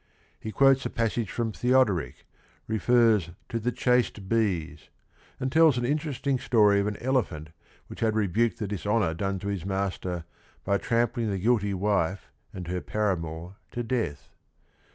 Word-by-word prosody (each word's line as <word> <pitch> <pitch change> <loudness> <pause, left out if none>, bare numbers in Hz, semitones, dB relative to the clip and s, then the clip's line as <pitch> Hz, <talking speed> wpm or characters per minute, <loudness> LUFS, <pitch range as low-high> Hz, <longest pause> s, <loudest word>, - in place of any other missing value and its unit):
He 110 - -6
quotes 135 +2 +4
a - - -2
passage 115 -3 -1
from 115 -2 -2
Theodoric, 120 - +1 0.4
refers 110 -4 +3 0.2
to 115 - -2
the 120 +3 -1
"chaste 125 -4 +1
bees," 90 -9 -1 0.5
and 130 0 -2
tells 160 -3 +5
an 120 - 0
interesting 140 -1 -1
story 105 -5 +4
of 100 - 0
an 105 - -3
elephant 110 - -1 0.4
which - - -11
had 110 -1 +1
rebuked 110 +3 +1
the 110 -4 -3
dishonor 105 -1 0
done 95 +3 -2
to 100 +2 -6
his 100 -4 -2
master 95 -2 -2 0.4
by 100 +1 +1
trampling 115 -1 0
the 100 - -1
guilty 105 -1 +1
wife 95 -1 -1 0.2
and 90 -2 -7
her 90 +1 -2
paramour 90 -3 -3 0.2
to 120 - -2
death. 110 - -3
105 Hz, 155 wpm, -27 LUFS, 95-120 Hz, 0.5 s, tells